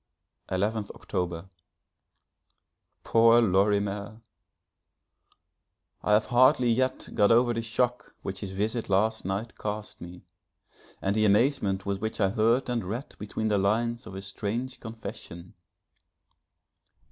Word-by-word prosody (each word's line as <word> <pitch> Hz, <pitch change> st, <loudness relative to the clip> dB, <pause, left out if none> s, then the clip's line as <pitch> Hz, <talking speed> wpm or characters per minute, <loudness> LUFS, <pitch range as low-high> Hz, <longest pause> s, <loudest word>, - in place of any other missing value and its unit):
11th 105 Hz, +3 st, -1 dB
October. 90 Hz, -1 st, -4 dB, 1.6 s
Poor 115 Hz, +1 st, +5 dB
Lorimer! 100 Hz, +1 st, +1 dB, 1.8 s
I 105 Hz, -, +1 dB
have 105 Hz, -, +4 dB
hardly 125 Hz, 0 st, +4 dB
yet 130 Hz, +2 st, 0 dB
got 105 Hz, 0 st, +4 dB
over 120 Hz, +1 st, +4 dB
the 115 Hz, -, -2 dB
shock 120 Hz, +2 st, -2 dB
which 95 Hz, 0 st, -4 dB
his 100 Hz, -2 st, -6 dB
visit 110 Hz, +4 st, -2 dB
last 110 Hz, +3 st, +1 dB
night 100 Hz, +4 st, -3 dB
caused 105 Hz, 0 st, -6 dB
me, 90 Hz, +1 st, -10 dB, 0.8 s
and 95 Hz, +1 st, +1 dB
the 110 Hz, 0 st, +3 dB
amazement 105 Hz, -2 st, +2 dB
with 100 Hz, -1 st, -2 dB
which 110 Hz, 0 st, -3 dB
I 100 Hz, -2 st, +3 dB
heard 115 Hz, +4 st, +2 dB
and 120 Hz, -3 st, -1 dB
read 110 Hz, +9 st, -6 dB
between 110 Hz, +1 st, -3 dB
the 105 Hz, -1 st, +2 dB
lines 115 Hz, +5 st, 0 dB
of 95 Hz, -, -9 dB
his 95 Hz, 0 st, -6 dB
strange 115 Hz, +6 st, -4 dB
confession. 105 Hz, -6 st, -9 dB
110 Hz, 125 wpm, -27 LUFS, 100-115 Hz, 1.8 s, Poor